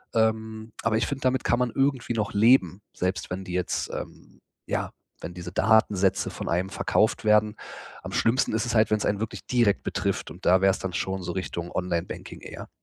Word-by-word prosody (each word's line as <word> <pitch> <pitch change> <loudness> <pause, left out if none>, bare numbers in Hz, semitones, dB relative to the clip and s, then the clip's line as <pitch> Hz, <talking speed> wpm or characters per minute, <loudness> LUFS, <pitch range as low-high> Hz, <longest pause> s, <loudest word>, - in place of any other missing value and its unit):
Ähm, 110 0 0
aber 115 -1 +2
ich 110 - +1
finde, 140 -1 -4
damit 130 0 +1
kann 120 - +2
man 125 - +1
irgendwie 135 -3 +1
noch 105 -3 -2
leben, 105 -4 +4
selbst 90 +2 -2
wenn 95 +1 -4
die 90 -1 -7
jetzt, 90 -1 -1
ähm - - -8 0.3
ja, - - -2 0.3
wenn 85 - -6
diese 90 0 -7
Datensätze 105 -2 +3
von - - -6
einem 90 +3 0
verkauft 110 +3 +1
werden. 105 0 +4 0.5
Am - - -6
schlimmsten 115 0 +2
ist 110 +2 0
es 120 - -1
halt, 110 0 +4
wenn's 105 -1 +2
einen 100 - 0
wirklich 110 0 -5
direkt 120 -5 +2
betrifft. - - -2
Und - - -12
da 95 +1 +5
wär's 95 0 +4
dann 95 -2 -4
schon 95 0 -2
so 90 - -3
Richtung 90 -2 -4
Online-Banking 90 -1 -4
eher. - - -9
105 Hz, 195 wpm, -26 LUFS, 95-115 Hz, 0.5 s, da